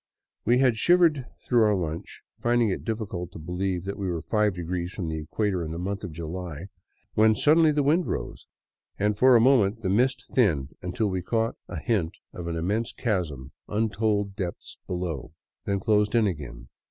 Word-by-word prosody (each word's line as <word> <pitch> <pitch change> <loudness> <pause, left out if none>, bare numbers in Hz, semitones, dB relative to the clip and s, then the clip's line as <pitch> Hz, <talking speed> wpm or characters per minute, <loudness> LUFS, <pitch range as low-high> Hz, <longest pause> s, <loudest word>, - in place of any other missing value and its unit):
We 120 +3 +4
had 125 -3 +3
shivered 165 -3 +4 0.2
through 120 -2 +3
our 105 -1 +4
lunch, 85 -3 -5 0.2
finding 120 -1 +2
it 95 - -3
difficult 100 -6 -4
to - - -8
believe 90 +2 -2
that 100 +1 -5
we 95 -2 -2
were 85 -2 -3
five 105 -3 +1
degrees 90 0 -3
from 90 -5 -4
the 80 0 -3
equator 90 +3 -1
in 80 - -5
the 80 - -5
month 100 +3 -3
of 85 - -5
July, 85 +2 -6 0.4
when 110 0 +5
suddenly 155 +5 +5
the 145 -1 +1
wind 160 +5 +2
rose, - - -5 0.5
and 105 +1 +1
for 130 +4 +6
a - - +7
moment 115 -3 +3
the 95 - 0
mist 125 +5 +2
thinned 80 - +2
until 90 +5 -1
we 95 -1 -1
caught 115 +5 0
a - - -6
hint 100 -9 -1 0.2
of 85 -1 -6
an 85 - -2
immense 100 +8 -1
chasm 80 - -2 0.2
untold 105 -1 0
depths 90 -4 -5
below; 85 -5 -4 0.3
then 100 0 0
closed 105 +1 +2
in 115 -2 +4
again. 65 -10 -5
100 Hz, 185 wpm, -26 LUFS, 85-115 Hz, 0.5 s, a